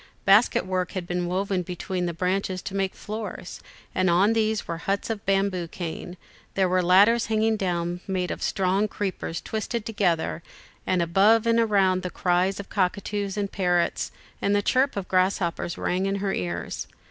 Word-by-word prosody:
Basket 200 +2 +5
work 185 -1 -2
had 185 -2 -3
been 175 0 -2
woven 190 +1 0
between 180 +1 -3
the - - -1
branches 185 +1 -1
to 195 - -6
make 195 -1 -1
floors, 210 -4 -6 0.3
and 185 0 +2
on 190 +6 +4
these 220 -1 0
were 165 -1 -4
huts 200 +5 -1
of 210 -3 -4
bamboo 195 -3 +1
cane; 175 +1 -6 0.4
there 190 -1 +3
were 185 0 +2
ladders 200 +6 +5
hanging 220 0 +2
down 175 -3 -2
made 185 -2 -1
of - - -5
strong 195 +2 +1
creepers 190 -5 -3
twisted 220 +1 -3
together, 175 -7 0 0.5
and 180 -2 +2
above 205 +7 +4
and 230 0 +3
around 195 -5 +3
the 180 - -3
cries 180 +2 +1
of 200 - -6
cockatoos 200 +1 -1
and 200 -1 -2
parrots 175 -3 0 0.3
and 200 +1 +2
the 205 - +2
chirp 265 +5 +2
of 190 -2 -3
grasshoppers 185 -2 0
rang 185 +2 0
in 195 - 0
her 200 -1 -1
ears. 85 -2 -3
190 Hz, 170 wpm, -25 LUFS, 180-205 Hz, 0.5 s, Basket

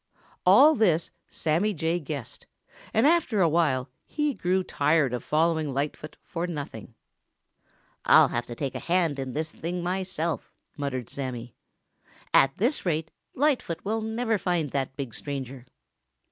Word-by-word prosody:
All 305 +2 +8
this 175 - +2 0.2
Sammy 175 +7 0
Jay 165 +2 0
guessed, 140 -6 -7 0.4
and 225 - +3
after 305 -9 +3
a 175 - +5
while 150 -6 +1 0.2
he 295 -2 0
grew 185 -3 0
tired 150 -5 +2
of 125 - -3
following 160 -1 +1
Lightfoot 150 +2 -3
for 170 +1 -4
nothing. 145 -7 -7 1.1
"I'll - - +7
have 120 0 -2
to 120 - -7
take 135 0 -3
a - - -4
hand 170 -5 +1
in 130 -2 -4
this 155 +1 -2
thing 175 +2 -4
myself," 180 -2 -2 0.2
muttered 135 -5 -4
Sammy. 125 -4 -5 0.8
"At 135 0 +5
this 245 +9 +1
rate, 160 -2 -1 0.2
Lightfoot 255 - 0
never 225 +2 -2
will - - +3
find 170 -6 -1
that 135 -1 -2
big 135 -5 -5
stranger!" 135 -2 -6
160 Hz, 145 wpm, -27 LUFS, 140-185 Hz, 1.1 s, All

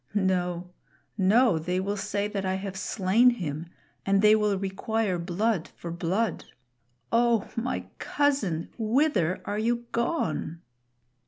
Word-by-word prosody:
No, 180 -2 0 0.4
no; 210 -1 +4
they 180 +3 -1
will 200 +2 -1
say 205 0 -2
that 205 -2 -3
I 190 0 0
have 195 0 -5
slain 200 +5 +3
him, 165 -8 -3 0.4
and 195 0 +2
they 210 0 +7
will 210 -2 +1
require 195 0 -1
blood 185 +2 0
for 170 - -7
blood. 180 +6 -1 0.7
Oh! 230 -2 +3
my 240 +2 -2
cousin, 270 - 0
wither 225 - +1
are 205 +1 -2
you 235 +2 0
gone?" 230 - -1
200 Hz, 130 wpm, -27 LUFS, 180-230 Hz, 0.7 s, they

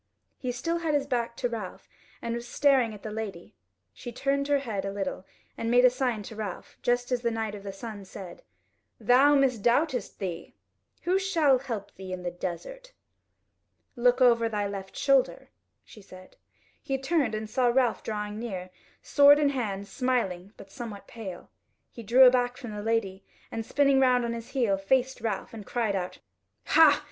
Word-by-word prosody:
He 255 - -2
still 330 +8 -2
had 320 -3 0
his 285 -1 +1
back 235 -3 -2
to - - 0
Ralph 220 -6 -7 0.4
and 235 - -2
was 235 +1 -5
staring 265 -3 +3
at 205 - -14
the 215 - -5
lady; 210 -5 -6 0.4
she 240 - -8
turned 280 +3 -1
her 290 -1 +3
head 225 -8 -3
a 195 - -3
little 195 -1 -4 0.3
and 230 - -2
made 245 +1 +5
a 250 - +7
sign 250 -4 -1
to 220 - -9
Ralph, 210 -4 -6
just 245 +1 0
as 250 -1 +1
the 235 - +1
Knight 225 -2 -3
of 205 - -8
the 200 0 -6
Sun 205 0 -8
said: 185 -2 -10 0.6
"Thou 275 +4 +5
misdoubtest 255 +1 +1
thee? 175 -4 -6 0.5
Who 370 +2 +2
shall 320 -9 +3
help 230 -7 -6
thee 190 -1 -9
in 185 -1 -5
the 175 - -2
desert?" - - -7 1.0
"Look 245 +1 +3
over 235 -2 +5
thy 210 -2 -1
left 195 -1 -7
shoulder," 275 -2 +2 0.3
she 215 - -14
said. 185 -1 -15 0.5
He 270 -3 -2
turned, 270 -4 0
and 215 0 -4
saw 250 +2 +1
Ralph 245 0 +2
drawing 210 -1 -4
near, 185 -6 -5 0.3
sword 285 0 +7
in 295 -1 +3
hand, 205 -7 -3
smiling, 200 -6 -1
but 195 - -13
somewhat 225 -5 -8
pale. 195 -6 -9 0.4
He 235 - -9
drew 240 +4 +6
aback 250 -1 +4
from 245 -4 -7
the 205 - -5
Lady 205 -3 -1 0.3
and, 225 - -3
spinning 275 +2 +3
round 250 -2 +4
on 235 - -2
his 230 0 -7
heel, 230 -8 +1
faced 260 +5 +1
Ralph, 220 -2 -3
and 220 -2 -8
cried 220 -2 -1
out: 180 -1 -3 0.5
"Hah! 315 -3 +6
235 Hz, 180 wpm, -28 LUFS, 205-265 Hz, 1.0 s, a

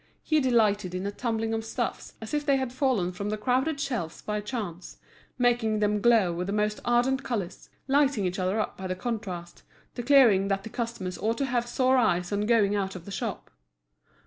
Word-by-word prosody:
He 310 -1 +2
delighted 210 -8 +2
in 185 +1 -3
a 200 - -1
tumbling 225 0 -2
of 225 0 -2
stuffs, 235 +1 -4
as 220 - -8
if 295 0 0
they 280 -2 +3
had 260 -2 -3
fallen 255 -10 +1
from 200 +3 -4
the 215 - -2
crowded 260 +7 0
shelves 235 - -3
by 210 0 -2
chance, 205 -6 -6 0.4
making 240 -3 +2
them 210 0 +1
glow 225 -7 +4
with 180 +2 -3
the 200 - -2
most 210 0 0
ardent 245 +3 +2
colours, 200 -8 -4 0.2
lighting 275 -6 +2
each 180 +1 -2
other 185 +4 0
up 215 - -2
by 190 - -6
the 185 - -2
contrast, 185 -6 -5 0.3
declaring 240 -6 +5
that 195 0 -1
the 220 - -7
customers 225 -6 -4
ought 225 +2 0
to 275 - 0
have 240 -2 -1
sore 255 +1 +2
eyes 180 -7 +1
on 205 +1 0
going 210 -3 +3
out 195 -1 -2
of 175 -2 -9
the 200 - -8
shop. - - -4
220 Hz, 200 wpm, -27 LUFS, 195-245 Hz, 0.4 s, declaring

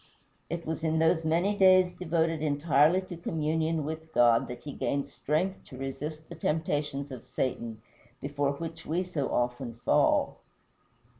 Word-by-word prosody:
It 170 0 -4
was 160 0 -3
in 160 0 +1
those 160 +1 +3
many 170 +6 +2
days 185 -2 +6
devoted 165 -3 0
entirely 150 +3 +3
to 185 -2 -8
communion 160 -1 -1
with 160 +1 -6
God 120 -1 +5
that 125 0 -8
he 145 - -6
gained 140 0 -1
strength 185 +6 -1
to 130 - -11
resist 150 +4 -5
the - - -9
temptations 145 -3 -1
of 125 -3 -8
Satan, 115 -4 -3 0.4
before 145 +1 -1
which 165 +2 -7
we 170 +4 -1
so 165 -7 -2
often 120 0 -1
fall. - - +3
155 Hz, 150 wpm, -29 LUFS, 140-165 Hz, 0.4 s, days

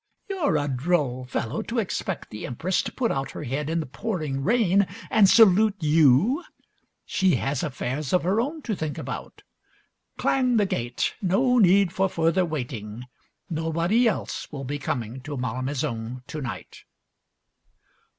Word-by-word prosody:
You're 365 - 0
a 145 0 -1
droll 130 -2 0
fellow, 125 +2 -3
to 240 - -5
expect 195 -3 -3
the 105 - -6
Empress 165 +9 0
to - - -5
put 240 -3 -1
out 135 0 -2
her - - -6
head 145 +3 -3
in 165 +1 0
the - - -5
pouring 150 - -3
rain 200 - +3 0.2
and 210 -3 +6
salute 215 -1 +6
you. 160 - +4 0.6
She 190 -3 +2
has 135 -1 -1
affairs 140 -2 -3
of 180 - +3
her 195 +6 +2
own 295 +4 -4
to 215 - -2
think 155 -4 -4
about. - - -7 0.7
Clang 255 -3 +2
the 205 - +3
gate, 120 -9 -2
no 245 +7 +3
need 195 -2 +5
for 190 0 +1
further 165 +2 +2
waiting, 120 -7 -5 0.4
nobody 170 +8 +1
else 215 - -3
will 140 -3 -6
be 145 +2 -4
coming 125 -1 -3
to 145 +2 -6
Malmaison 125 -1 -3
to 155 - -6
night. 130 - -7
160 Hz, 150 wpm, -25 LUFS, 135-200 Hz, 0.7 s, and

